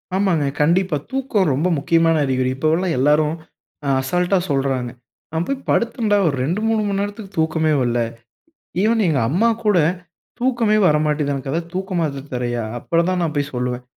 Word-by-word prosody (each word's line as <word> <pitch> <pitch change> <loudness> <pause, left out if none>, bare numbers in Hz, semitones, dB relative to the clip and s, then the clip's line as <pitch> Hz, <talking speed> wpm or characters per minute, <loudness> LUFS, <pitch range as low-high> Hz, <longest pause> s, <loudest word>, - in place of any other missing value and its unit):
ஆமாங்க, 185 -7 +1 0.2
கண்டிப்பா. 170 +1 +2
தூக்கம் 250 - +1
ரொம்ப 150 +7 +1
முக்கியமான 165 +2 +2
அறிகுறி. 130 -1 0
இப்பவுள்ள 160 +6 +1
எல்லோரும் 150 +3 +3 0.5
அ - - -2
அசால்டா 180 +7 +1
சொல்றாங்க, 135 -3 0 0.4
"நான் 160 +1 -1
போய் 275 - -1
படுத்தேன்டா, 230 -3 +1
ஒரு 145 - +1
2, 175 +9 -1
3 225 -1 +2
மணி 200 0 -1
நேரத்துக்கு 205 0 -6
தூக்கமே 160 0 +1
வல்ல. 120 -1 +1 0.8
ஈவன் 225 +1 +2
எங்க 150 -5 +2
அம்மா 215 +10 +3 0.2
கூட 205 -4 +4 0.6
தூக்கமே 235 -4 +2
வரமாட்டீங்குது 150 -1 +1
எனக்கு 160 +6 -4
தூக்கமாத்தர 170 -7 -2
தரியா?" 120 -1 -2 0.2
அப்புறம் 170 +6 0
தான் 180 -1 0
நான் 160 -2 -2
போய் 145 0 -1
சொல்லுவேன். 125 0 -3
165 Hz, 150 wpm, -20 LUFS, 140-195 Hz, 0.8 s, கூட